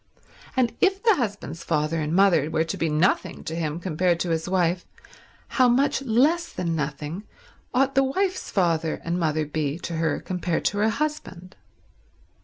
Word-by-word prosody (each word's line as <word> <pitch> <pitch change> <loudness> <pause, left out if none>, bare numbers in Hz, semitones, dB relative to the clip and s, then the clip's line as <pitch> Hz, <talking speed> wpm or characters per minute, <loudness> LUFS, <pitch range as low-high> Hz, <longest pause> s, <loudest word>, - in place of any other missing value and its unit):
And 245 -3 +2
if 390 +2 +2
the 450 -2 +6
husband's 200 - -4
father 155 0 0
and 150 0 -2
mother 170 -5 +4
were 160 - +1
to 165 - -4
be 165 - -1
nothing 155 +5 +1
to 160 - -5
him 160 -1 -2
compared 175 0 0
to 175 - -1
his 160 +1 -1
wife, 180 -1 +1 0.6
how 255 -2 +3
much 270 +3 +2
less 275 +8 +2
than 170 -2 -2
nothing 150 +4 -4 0.5
ought 270 +1 +2
the 270 - +4
wife's 370 +7 -1
father 165 -4 0
and 170 +2 -1
mother 155 -2 0
be 150 0 -2
to 170 -2 -5
her 160 0 0
compared 180 -2 -2
to 205 - +1
her 215 +2 +3
husband. 220 - -4
175 Hz, 170 wpm, -25 LUFS, 160-240 Hz, 0.6 s, the